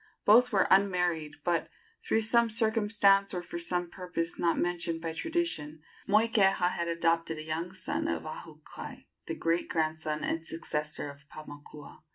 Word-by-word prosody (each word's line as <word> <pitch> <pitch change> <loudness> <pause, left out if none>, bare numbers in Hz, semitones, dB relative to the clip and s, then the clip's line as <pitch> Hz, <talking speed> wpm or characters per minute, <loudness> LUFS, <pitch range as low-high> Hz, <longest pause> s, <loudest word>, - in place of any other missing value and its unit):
Both 245 +4 +6
were 195 -3 +3
unmarried, 180 -6 +2
but, 170 -1 0 0.3
through 225 - +1
some 235 +1 +4
circumstance 210 -3 +3
or 175 - -3
for 170 - -6
some 175 +1 0
purpose 175 -2 -4
not 170 -1 +1
mentioned 175 -1 -1
by 165 0 -4
tradition, 160 - -2 0.2
Moikeha 200 -4 +3
had 170 -1 -3
adopted 165 -1 0
a 155 - -6
young 160 +3 -3
son 190 - -3
of - - -2
Ahukai, 155 0 -9 0.2
the - - -3
great 165 +1 -1
grandson 155 -1 -1
and 165 - -2
successor 150 -2 -3
of 140 0 -19
Paumakua. 145 -1 -11
170 Hz, 150 wpm, -29 LUFS, 160-200 Hz, 0.3 s, Both